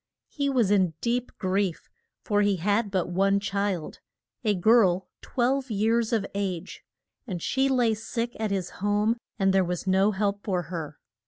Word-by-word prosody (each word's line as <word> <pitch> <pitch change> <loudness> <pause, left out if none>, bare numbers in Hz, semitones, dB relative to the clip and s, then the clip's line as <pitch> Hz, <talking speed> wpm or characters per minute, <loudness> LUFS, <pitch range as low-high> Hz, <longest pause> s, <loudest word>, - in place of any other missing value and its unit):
He 280 -2 -1
was 240 -7 +2
in 185 -6 +3
deep 245 +1 -1
grief, 185 -2 -1 0.4
for 205 -1 +1
he 205 -1 +3
had 205 +5 +1
but 190 -3 0
one 195 +2 +2
child, 200 -4 -2 0.4
a 210 -3 +2
girl 190 -2 +3
twelve 260 +2 0
years 225 +2 +1
of 220 -4 +1
age, 190 -4 -4 0.4
and 185 -5 -3
she 265 +10 +1
lay 245 -4 +3
sick 230 +2 -4
at 220 -1 -1
his 190 -3 -2
home 205 +3 +2 0.2
and 195 -2 +2
there 190 -1 +4
was 180 0 -3
no 190 +2 +3
help 200 0 -1
for 185 -4 -1
her. 155 -3 -5
205 Hz, 165 wpm, -26 LUFS, 190-225 Hz, 0.4 s, there